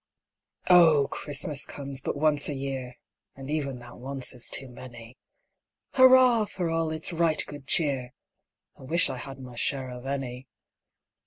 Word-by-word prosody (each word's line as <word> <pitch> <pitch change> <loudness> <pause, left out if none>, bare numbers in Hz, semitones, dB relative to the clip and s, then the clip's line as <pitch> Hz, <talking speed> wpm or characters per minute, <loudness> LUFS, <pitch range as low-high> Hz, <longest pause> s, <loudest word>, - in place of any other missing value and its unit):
O, 160 -6 +6
CHRISTMAS 145 -1 -1
comes 140 -1 -6
but - - -4
once 150 -1 +2
a 145 - -3
year! 135 -2 -5 0.4
(And 135 +1 -8
even 140 -4 -2
that 120 0 -12
is - - -15
once 130 -2 -3
too 135 - -4
many;) 120 -1 -12 0.7
Hurrah 255 -4 +6
for 180 -5 -4
all 165 -1 0
its 155 +2 0
right 165 -1 +1
good 145 -2 -11
cheer! 140 -7 +1 0.7
(_I 130 - -12
wish 170 +4 +4
I - - -6
had 135 -1 -8
my 125 -2 -11
share 130 +1 -1
of 125 +1 -9
any! 130 -2 -5
140 Hz, 155 wpm, -26 LUFS, 130-155 Hz, 0.7 s, O